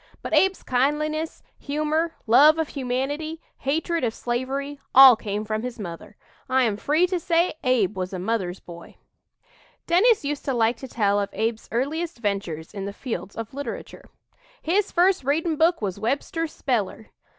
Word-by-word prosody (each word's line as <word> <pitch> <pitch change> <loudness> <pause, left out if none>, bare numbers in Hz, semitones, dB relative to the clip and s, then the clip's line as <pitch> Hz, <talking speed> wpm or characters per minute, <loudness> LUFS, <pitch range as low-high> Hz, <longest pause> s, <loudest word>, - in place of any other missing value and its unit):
But - - -5
Abe's 385 0 +3
kindliness, 305 +5 -1 0.2
humor, 305 +3 -1
love 290 +8 +6
of 320 -2 -1
humanity, 280 +5 -3 0.2
hatred 320 +3 -1
of 230 -2 -1
slavery, 270 +4 -3 0.2
all 265 -2 +10
came 210 0 -4
from 215 0 -2
his 250 0 -5
mother. 175 -6 -8 0.3
I 260 0 +3
am 220 -4 +1
free 300 - +2
to 360 0 -1
say 340 +1 +1
Abe 235 -7 +2
was 185 -1 -3
a 190 - -4
'mother's 190 -2 -2
boy.'" 170 -1 -12 0.9
Dennis 395 +2 +4
used 290 0 -3
to 270 - 0
like 230 0 +2
to 265 - -8
tell 205 -4 +1
of 200 - -2
Abe's 225 +1 -2
earliest 310 +8 -2
ventures 195 -7 -3
in 195 -2 -5
the 200 - -5
fields 225 -4 -6
of 225 +1 -6
literature: 285 +1 -7 0.5
"His 385 +5 +1
first 360 -3 +3
readin' 315 +4 0
book 325 -3 +2
was 195 -1 -3
Webster's 285 +8 -2
speller. 225 -4 -2
265 Hz, 160 wpm, -24 LUFS, 220-315 Hz, 0.9 s, all